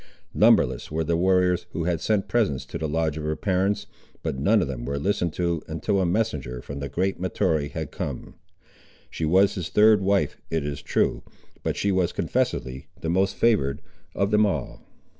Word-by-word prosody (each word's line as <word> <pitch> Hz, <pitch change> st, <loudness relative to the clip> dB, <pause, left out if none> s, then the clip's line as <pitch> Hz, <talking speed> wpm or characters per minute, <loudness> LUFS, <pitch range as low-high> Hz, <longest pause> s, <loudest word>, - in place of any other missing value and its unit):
Numberless -, -, +3 dB
were 80 Hz, +1 st, -1 dB
the 85 Hz, +2 st, 0 dB
warriors, 90 Hz, 0 st, +2 dB
who 85 Hz, -, -2 dB
had 85 Hz, -1 st, -1 dB
sent 105 Hz, 0 st, +1 dB
presents 85 Hz, -, 0 dB
to -, -, -6 dB
the 80 Hz, -, -1 dB
lodge 80 Hz, 0 st, 0 dB
of -, -, -5 dB
her 75 Hz, 0 st, -1 dB
parents, 95 Hz, +4 st, 0 dB, 0.4 s
but -, -, -2 dB
none 100 Hz, +12 st, +3 dB
of -, -, -3 dB
them 65 Hz, -3 st, -5 dB
were 70 Hz, +3 st, -3 dB
listened 90 Hz, +2 st, 0 dB
to 85 Hz, -3 st, -1 dB
until 95 Hz, +5 st, -1 dB
a 90 Hz, -, +1 dB
messenger 75 Hz, -, -1 dB
from 70 Hz, +3 st, -7 dB
the 70 Hz, 0 st, -4 dB
great 90 Hz, +7 st, -1 dB
Mahtoree 80 Hz, -4 st, 0 dB
had -, -, -5 dB
come. -, -, -5 dB, 0.8 s
She 80 Hz, -, -2 dB
was 95 Hz, +5 st, +4 dB
his 90 Hz, -2 st, -4 dB
third 105 Hz, +1 st, +5 dB
wife, 95 Hz, -5 st, +1 dB
it 80 Hz, -3 st, -1 dB
is 70 Hz, -1 st, -4 dB
true, -, -, 0 dB, 0.4 s
but -, -, -2 dB
she 100 Hz, -, +1 dB
was 95 Hz, -2 st, +1 dB
confessedly 65 Hz, 0 st, -2 dB
the 80 Hz, -, -3 dB
most 95 Hz, +2 st, +1 dB
favoured 70 Hz, -13 st, +2 dB, 0.4 s
of 100 Hz, +2 st, 0 dB
them 105 Hz, 0 st, +4 dB
all. 90 Hz, -, -2 dB
85 Hz, 190 wpm, -25 LUFS, 75-95 Hz, 0.8 s, third